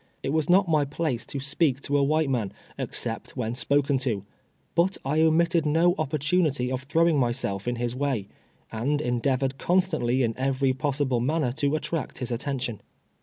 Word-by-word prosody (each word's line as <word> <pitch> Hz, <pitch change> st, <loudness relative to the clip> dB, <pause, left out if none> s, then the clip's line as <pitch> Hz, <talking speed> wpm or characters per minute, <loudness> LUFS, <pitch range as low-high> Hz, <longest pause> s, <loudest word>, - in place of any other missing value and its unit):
It 135 Hz, -, -1 dB
was 160 Hz, 0 st, 0 dB
not 190 Hz, +2 st, +5 dB
my 155 Hz, -3 st, +3 dB
place 140 Hz, -3 st, -2 dB
to 140 Hz, -, -4 dB
speak 140 Hz, 0 st, +1 dB
to 145 Hz, -, -2 dB
a 145 Hz, -, +4 dB
white 155 Hz, +2 st, +2 dB
man 120 Hz, -7 st, -1 dB, 0.2 s
except -, -, -3 dB
when 115 Hz, -2 st, -2 dB
spoken 140 Hz, +2 st, +1 dB
to, 110 Hz, -7 st, -2 dB, 0.5 s
but 175 Hz, +3 st, +2 dB
I 150 Hz, +4 st, +2 dB
omitted 165 Hz, +1 st, +3 dB
no 165 Hz, +4 st, +3 dB
oppor 155 Hz, -4 st, -2 dB
tunity 145 Hz, -4 st, +1 dB
of 130 Hz, -, -2 dB
throwing 160 Hz, +2 st, +2 dB
myself 120 Hz, -5 st, -1 dB
in 120 Hz, -, 0 dB
his 120 Hz, 0 st, -2 dB
way, 130 Hz, -7 st, -1 dB, 0.4 s
and 135 Hz, +7 st, 0 dB
endeavored 130 Hz, +1 st, 0 dB
constantly 170 Hz, -9 st, +1 dB
in 115 Hz, -2 st, 0 dB
every 135 Hz, 0 st, +1 dB
possible 135 Hz, -1 st, 0 dB
manner 140 Hz, +1 st, 0 dB
to 145 Hz, +2 st, 0 dB
attract 155 Hz, -1 st, -3 dB
his 125 Hz, -1 st, -4 dB
attention. 120 Hz, -3 st, -3 dB
140 Hz, 170 wpm, -26 LUFS, 125-155 Hz, 0.5 s, not